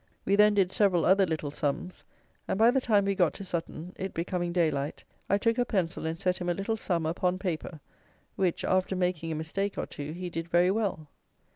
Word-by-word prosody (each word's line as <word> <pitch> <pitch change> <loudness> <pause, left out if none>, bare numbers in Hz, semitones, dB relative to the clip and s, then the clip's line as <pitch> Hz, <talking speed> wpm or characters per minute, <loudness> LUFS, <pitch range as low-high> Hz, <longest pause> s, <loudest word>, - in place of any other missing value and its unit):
We 200 - +3
then 210 0 +5
did 190 -2 +3
several 190 -6 +3
other 190 0 +5
little 155 -3 -3
sums; 145 +5 -3 0.4
and, - - -1
by 225 +3 +6
the 265 +1 +1
time 210 -5 +3
we 200 - +1
got 180 -4 +2
to 195 - -7
Sutton, 170 0 -5
it 190 +1 -5
becoming 175 +1 -2
daylight, 155 -5 0 0.3
I 200 - +4
took 230 +3 +1
a - - +4
pencil 180 -8 -1
and 160 +1 -3
set 180 +1 0
him 175 -1 -2
a 175 - +1
little 200 +4 -1
sum 175 -6 -1
upon 180 +3 0
paper, 170 -4 -4 0.5
which, 185 -3 0
after 185 0 +1
making 180 -3 -1
a - - -2
mistake 195 +6 -2
or - - -1
two, 145 +1 -7
he 180 +1 -5
did 165 0 -4
very 175 +2 +4
well. 195 -7 -1
180 Hz, 215 wpm, -29 LUFS, 165-195 Hz, 0.5 s, by